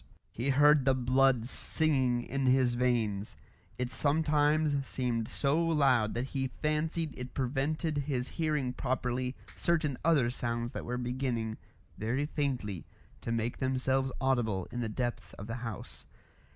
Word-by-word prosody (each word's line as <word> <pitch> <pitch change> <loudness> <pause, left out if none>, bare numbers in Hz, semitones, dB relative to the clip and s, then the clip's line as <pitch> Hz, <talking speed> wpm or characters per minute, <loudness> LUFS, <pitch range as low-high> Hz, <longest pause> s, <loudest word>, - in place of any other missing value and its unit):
He 125 +5 -2
heard 145 +1 +6
the 135 -1 +4
blood 130 -1 +3
singing 130 -5 +1
in 135 +1 -1
his 130 -1 +4
veins. 115 -5 0 0.4
It 125 0 -2
sometimes 150 0 +2
seemed 120 -3 -1
so 150 +4 +1
loud 135 -9 +3
that 125 +3 -2
he 135 -1 0
fancied 155 +2 -1
it 125 0 -8
prevented 145 +4 0
his 135 -3 -2
hearing 150 -6 -1
properly 125 0 -1 0.2
certain 155 -6 0
other 145 -7 +3
sounds 120 -1 -2
that - - -6
were 125 +1 -2
beginning 120 -3 -2 0.4
very 125 +7 0
faintly 125 - -2 0.3
to - - -3
make 115 +1 -1
themselves 130 0 +1
audible 120 -8 +1
in 120 - -4
the 115 -2 -1
depths 120 +2 -3
of 100 - -8
the 115 +2 -4
house. 115 -4 -6
130 Hz, 140 wpm, -31 LUFS, 120-145 Hz, 0.4 s, heard